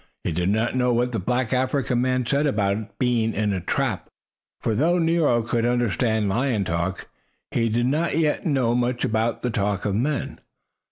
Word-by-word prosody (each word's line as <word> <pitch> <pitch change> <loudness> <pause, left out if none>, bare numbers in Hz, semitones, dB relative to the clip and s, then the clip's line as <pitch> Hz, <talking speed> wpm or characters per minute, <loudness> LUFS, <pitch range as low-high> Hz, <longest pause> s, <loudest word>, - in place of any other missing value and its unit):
He - - -1
did 90 +3 0
not 110 +4 0
know 125 -1 +2
what 120 +1 +1
the 115 - -2
black 125 +5 -1
African 130 -1 0
man 130 0 0
said 140 +5 +1
about 105 -3 -1
being 120 -3 +1
in 105 0 0
a 95 - -2
"trap," - - -2 0.5
for 110 - -1
though 160 +10 +2
Nero 165 -8 +2
could 115 0 -1
understand 115 -2 +1
lion 115 +1 0
talk, 85 +3 -2 0.4
he 115 -1 +1
did 120 +2 +1
not 155 +5 0
yet 155 -2 +1
know 130 -7 +1
much 120 0 0
about 110 +1 -1
the 125 - 0
talk 100 -3 -1
of 105 - 0
men. 130 +5 -2
120 Hz, 180 wpm, -23 LUFS, 110-130 Hz, 0.5 s, know